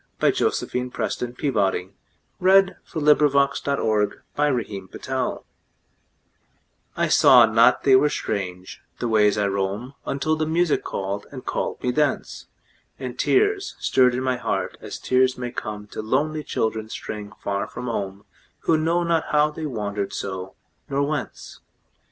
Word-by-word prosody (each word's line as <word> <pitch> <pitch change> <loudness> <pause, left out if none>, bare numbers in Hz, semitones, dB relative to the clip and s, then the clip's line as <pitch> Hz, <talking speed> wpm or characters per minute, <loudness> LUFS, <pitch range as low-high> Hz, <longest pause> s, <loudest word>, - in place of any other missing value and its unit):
By - - +4
Josephine 125 0 -1
PrestonPeabody 120 -8 -1 0.5
1671 160 -6 +3
After 140 0 0
Music 120 +2 -3 1.5
I - - +2
SAW 125 -3 +7
not 115 +1 +4
they 135 -2 +6
were 145 +3 +5
strange, 90 -7 -4 0.2
the 120 - -2
ways 105 -2 +3
I 105 - +1
roam, 100 +6 -2
Until 155 +3 0
the 155 0 -1
music 170 0 +1
called, 100 +1 -4
and 130 -3 -9
called - - -3
me 125 - +1
thence, 145 +2 -1 0.5
And - - -7
tears 405 0 +2
stirred 125 -1 +3
in 130 - -2
my 130 -1 0
heart - - -2
as - - -7
tears 130 0 +2
may 125 -1 -4
comeTo 105 -3 -6
lonely 150 +7 0
children 110 -3 -2
straying 105 -1 -6
far 100 -2 -3
from 125 - -7
home, 100 -4 -4 0.4
Who 160 - +2
know 165 +2 +1
not 170 -2 +1
how 150 0 +3
they 155 0 -5
wandered 105 -5 -3
so, 95 -1 -5 0.3
nor 140 +1 +1
whence. 150 0 -4
125 Hz, 135 wpm, -23 LUFS, 105-150 Hz, 1.5 s, SAW